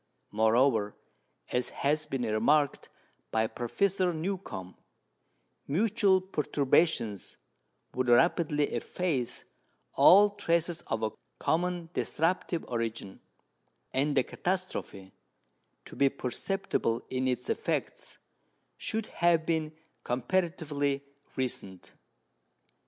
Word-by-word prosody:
Moreover, 110 0 +3 0.6
as 125 0 0
has 150 +2 -1
been 135 -3 -2
remarked 125 +7 +1 0.4
by 110 0 +1
Professor 180 - 0
Newcomb, 160 - -5 0.9
mutual 190 +3 +3
perturbations 145 - 0 0.6
would 130 0 -1
rapidly 150 +3 +3
efface 150 -10 -2 0.5
all 205 +3 +7
traces 170 -4 0
of 110 -1 -2
a 110 - 0 0.3
common 175 0 -1
disruptive 170 +1 -1
origin, 115 -4 -4 0.7
and 140 +2 +1
the 130 - +5
catastrophe, 180 - -4 0.7
to - - -11
be 140 0 +4
perceptible 130 - -2
in 130 0 0
its 125 -1 -1
effects, - - -3 0.6
should 220 - -2
have 170 -5 +2
been 160 -2 0 0.3
comparatively 145 0 -1 0.3
recent. 100 -8 -3
145 Hz, 90 wpm, -30 LUFS, 120-175 Hz, 0.9 s, all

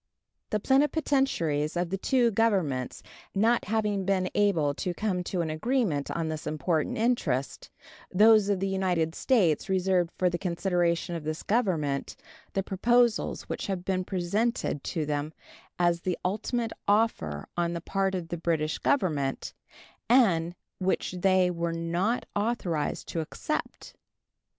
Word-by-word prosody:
The 210 - 0
plenipotentiaries 265 - +1
of 175 0 -1
the 195 - 0
two 245 +1 +2
Governments 190 - 0 0.3
not 230 +4 +3
having 210 -1 0
been 185 -1 0
able 170 -9 +2
to 175 +4 -3
come 190 -4 -1
to 180 -1 -1
an 160 -2 -2
agreement 180 - 0
on 165 -1 -2
this 155 -1 -4
important 155 +1 -1
interest, 175 - -1 0.4
those 215 +1 +5
of 200 -2 +1
the 195 - 0
United 180 -4 0
States 185 - +2
reserved 185 -2 +2
for 185 - +2
the 175 -1 -1
consideration 175 -2 0
of 165 -2 -4
this 155 +1 -4
Government 165 - 0 0.4
the 195 - 0
proposals 235 +4 +2
which - - -5
had 185 -2 -3
been 185 -1 0
presented 190 - -1
to 160 -4 -2
them 150 +1 -2 0.4
as 175 -1 +2
the 180 -2 -1
ultimate 225 +4 -1
offer 200 - +1
on 170 -1 0
the 170 - -3
part 195 +1 -1
of 170 -3 -4
the 175 - -3
British 160 -2 -1
Government, 150 - 0 0.6
and 175 -9 +4 0.2
which 190 0 0
they 185 0 +3
were 170 -1 -2
not 170 +8 -1
authorized 205 -8 -1
to 165 - -2
accept. 155 - -4
180 Hz, 140 wpm, -28 LUFS, 165-210 Hz, 0.6 s, those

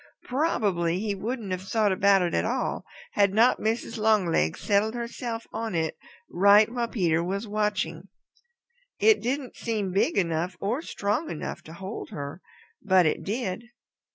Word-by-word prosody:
Probably 205 - 0
he 210 0 -1
wouldn't 215 +1 -4
have 185 0 -2
thought 205 +2 +1
about 195 0 +4
it 175 - -1
at - - +1
all 245 +4 -2 0.3
had 200 -1 +2
not 235 +3 +5
Mrs. 225 +1 -2
Longlegs 190 - +2
settled 210 +3 +1
herself 235 -1 -4
on 225 -4 -3
it 160 -1 -1 0.3
right 200 +3 +6
while 240 -1 -1
Peter 170 -8 +1
was 200 +5 -3
watching. 210 0 -1 0.9
It 440 -1 +4
didn't 260 +2 -3
seem 215 -5 -2
big 195 +2 +1
enough 175 0 0
or 230 +9 -1
strong 210 +2 -2
enough 155 - -5
to 160 - -10
hold 190 +5 -7
her, 145 -2 -7 0.4
but 190 -3 +4
it 155 - +1
did. 220 0 -3
205 Hz, 155 wpm, -26 LUFS, 185-230 Hz, 0.9 s, right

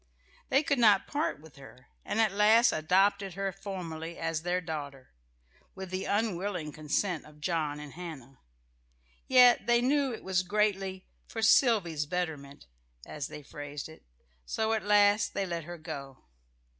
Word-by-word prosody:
They 270 +3 +3
could 280 -3 0
not 210 -4 +5
part 290 - -2
with 155 -2 -16
her, 130 -2 -15
and 215 - -2
at 220 -2 +3
last 220 +4 +5
adopted 195 +4 +1
her 195 0 -2
formally 170 -4 -7
as 165 -1 -2
their 180 +2 0
daughter, 145 -6 -7 0.6
with 190 -1 -8
the 185 0 -3
unwilling 195 -6 -1
consent 155 +3 -2
of 150 0 -16
John 155 -2 -2
and 150 -2 -9
Hannah. 150 -7 -9 0.9
Yet 250 -3 +6
they 240 0 +4
knew 275 +2 +1
it 225 - -7
was 190 -1 +1
greatly 195 -1 -1 0.2
"for 225 - -5
Sylvy's 195 - +3
betterment," 150 - -4 0.4
as 150 -2 -5
they 150 - -10
phrased 145 0 -7
it; 160 - -14 0.4
so 220 - -1
at 220 - 0
last 205 +1 +3
they 195 - 0
let 170 -3 -4
her 175 +1 -8
go. 140 -5 -8
180 Hz, 155 wpm, -30 LUFS, 155-210 Hz, 0.9 s, Yet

